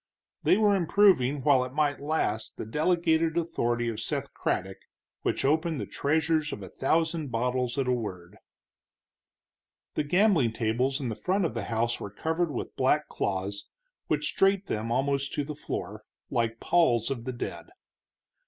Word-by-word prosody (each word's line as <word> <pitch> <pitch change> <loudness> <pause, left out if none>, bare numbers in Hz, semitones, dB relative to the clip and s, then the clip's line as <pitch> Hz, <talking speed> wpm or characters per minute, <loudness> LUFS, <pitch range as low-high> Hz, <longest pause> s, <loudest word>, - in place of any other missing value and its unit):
They - - +4
were 210 -2 +4
improving 165 -7 +3
while 140 -4 +5
it 130 0 -7
might 145 -1 +1
last 140 -7 -2
the - - -5
delegated 160 - +1
authority 120 -8 0
of 115 -2 -3
Seth - - -3
Craddock, 95 +1 -2 0.4
which - - -1
opened 160 +1 +1
the - - -3
treasures 155 +1 0
of 100 - -6
a 95 - -8
thousand 160 - 0
bottles 125 +2 -1
at 135 -2 0
a - - +2
word. 95 -8 -5 1.6
The - - 0
gambling 170 - +3
tables 125 +5 0
in 130 -4 -3
the 110 - -3
front 185 - 0
of 140 - -2
the 115 - -3
house 115 +1 0
were - - -5
covered 160 - -1
with 135 - -5
black 145 +3 +2
cloths, 100 +1 -3 0.4
which - - -1
draped 195 0 +3
them 110 - -3
almost 140 +2 0
to 145 - -1
the 150 +2 -5
floor, 105 -7 -5 0.3
like 115 -2 0
palls 125 -9 +2
of 120 -4 -4
the 130 - -3
dead. 120 - -6
135 Hz, 160 wpm, -28 LUFS, 115-160 Hz, 1.6 s, while